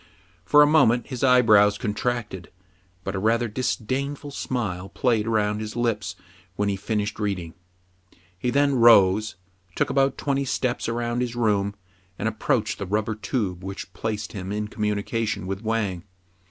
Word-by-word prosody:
For 145 +10 +7
a - - +6
moment 125 -6 +4
his 130 -2 -4
eye 125 -1 +6
brows 105 -2 +5
contracted; 105 -4 -3 0.5
but 95 - -3
a 95 - -2
rather 115 +4 +2
disdainful 130 +5 -3
smile 100 -9 -3
played 115 -4 0
round 105 -1 0
his 110 0 -6
lips 105 -5 -1 0.4
when 100 +1 0
he 100 - 0
finished 105 +1 -3
reading. 95 -6 -3 0.8
He 90 +7 -2
then 140 +2 +2
rose, 110 -2 +5 0.4
took - - 0
about 135 0 +2
twenty 140 -1 0
steps 125 -2 -1
around 120 +1 -1
his 120 -1 -2
room, 100 -4 +1 0.4
and 110 - -2
approached 110 -1 -1
the 100 - -4
rubber 105 +3 0
tube 100 -3 -3
which 95 +1 -7
placed 105 -2 -4
him 95 -2 -5
in 105 0 -3
communication 105 0 -2
with 95 +1 -4
Wang. 110 -6 -1
110 Hz, 155 wpm, -24 LUFS, 100-120 Hz, 0.8 s, For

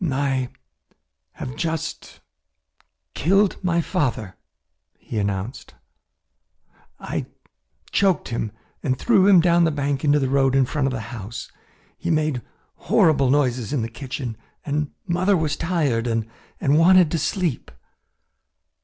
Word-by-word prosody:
"I 135 -2 0 0.8
have 130 +1 -7
just 160 -1 -4 0.9
killed 195 +5 +2
my 170 -2 +2
father," 125 - -2 0.6
he 110 - -5
announced. 100 +4 -4 1.2
"I - - -4 0.6
choked 190 -6 +2
him 115 -2 -3 0.3
and 130 -3 0
threw 200 - +4
him 190 -4 +7
down 170 0 +4
the 165 - +4
bank 140 -2 -2
into 145 -1 +4
the 135 -2 +1
road 135 0 +2
in 135 -1 +4
front 140 +1 -1
of - - -1
the 120 -3 -3
house. 115 0 -7 0.5
He - - -3
made 155 -5 +1 0.5
horrible 140 -5 +4
noises 130 -3 +1
in 130 -6 0
the 115 - -3
kitchen 125 -1 -6 0.3
and 150 0 -1 0.2
mother 185 +2 +2
was 155 -3 0
tired 150 -10 0
and 115 -1 0 0.3
wanted 165 +4 +5
to 165 - 0
sleep." 170 -2 -1
145 Hz, 125 wpm, -23 LUFS, 125-165 Hz, 1.2 s, him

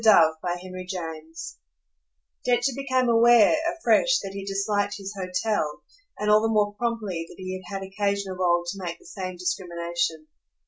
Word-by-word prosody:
Book 165 -8 +6
Eighth, 185 +1 -5
Chapter 180 -3 -3 0.2
1 - - -22 1.1
Densher 250 +2 +2
became 260 -2 +1
aware, 235 +1 +6 0.2
afresh, - - +3
that 195 - -5
he 195 0 -5
disliked 200 +1 0
his 195 0 -6
hotel 185 -3 -1 0.3
and 210 - -2
all 210 0 +6
the 225 - +2
more 210 -2 +2
promptly 210 -7 -2
that - - -12
he 185 0 -5
had 200 - -5
had 195 0 -4
occasion 200 0 -1
of 185 - -7
old 175 -1 +2
to 195 -1 -8
make 170 -1 -4
the - - -22
same 185 -3 -5
discrimination. 170 -2 -2
195 Hz, 170 wpm, -26 LUFS, 180-215 Hz, 1.1 s, Book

